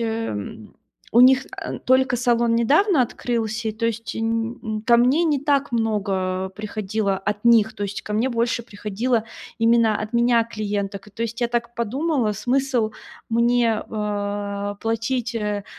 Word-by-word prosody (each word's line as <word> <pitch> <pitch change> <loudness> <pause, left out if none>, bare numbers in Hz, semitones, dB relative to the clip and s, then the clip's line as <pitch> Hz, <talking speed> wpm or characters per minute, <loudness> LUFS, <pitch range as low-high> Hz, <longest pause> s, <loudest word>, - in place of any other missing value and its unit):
эм, 220 - -4 0.4
у 235 - +6
них 260 +2 +6
ан - - -5
только 260 0 +3
салон 235 -1 +2
недавно 295 - +4
открылся, 225 -2 -2
и, - - -2
то 230 +2 -2
есть, 230 0 -3
нь 225 +1 -1
нь 215 -2 -3
ко 235 +1 +5
мне 265 +8 +3
не 295 -4 +1
так 285 -2 +1
много 195 -4 -1
приходило 210 0 -2
от 210 +2 -3
них, 225 -2 +5
то - - -6
есть 200 0 -5
ко 210 - -6
мне 225 +5 +1
больше 235 +1 0
приходило 220 +2 -2 0.3
именно 230 -1 +4
от 215 +2 -5
меня 235 -1 +3
клиенток. 205 -3 -4
И - - -18
то 230 - -4
есть 230 +1 -4
я 240 - +1
так 235 0 -2
подумала: 250 +1 0
смысл 245 0 0 0.4
мне, 235 -1 +2
э, 205 -1 -3
платить, 230 +2 -1
э, 210 -2 -2
230 Hz, 160 wpm, -22 LUFS, 210-240 Hz, 0.4 s, у